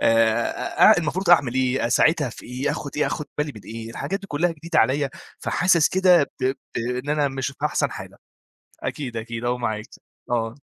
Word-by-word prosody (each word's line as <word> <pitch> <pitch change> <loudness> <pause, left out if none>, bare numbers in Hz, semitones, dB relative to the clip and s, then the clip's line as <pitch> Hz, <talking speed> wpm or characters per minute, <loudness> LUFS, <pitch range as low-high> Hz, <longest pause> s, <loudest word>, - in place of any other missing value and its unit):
آآ، 115 -1 +4
أ - - +3
المفروض 175 +3 -1
أعمل 140 -8 +5
إيه؟ 130 -1 +1
أساعدها 145 +4 +3
في - - -12
إيه؟ 125 +4 -2
آخُد 145 - -4
إيه، 150 - +2
آخُد 150 - -3
بالي 150 0 -1
من 105 - -10
إيه؟ 115 0 -7
الحاجات 150 - -3
دي 195 - -10
كلّها 170 +1 0
جديدة 165 +1 -2
عليَّ 140 +1 +2 0.3
فحاسس 170 -3 +3
كده 185 -3 +5 0.2
ب - - -1
ب 130 +1 +1 0.2
إن 125 +3 -3
أنا 150 -1 +2
مش 135 -1 -3
في 140 +1 -5
أحسن - - 0
حالة. - - -9 0.7
أكيد، 125 -6 -4
أكيد 115 +1 -5
أهو 125 +1 0
معاك، 110 -3 -3 0.4
آه. 115 -1 -1
135 Hz, 190 wpm, -23 LUFS, 120-150 Hz, 0.7 s, أعمل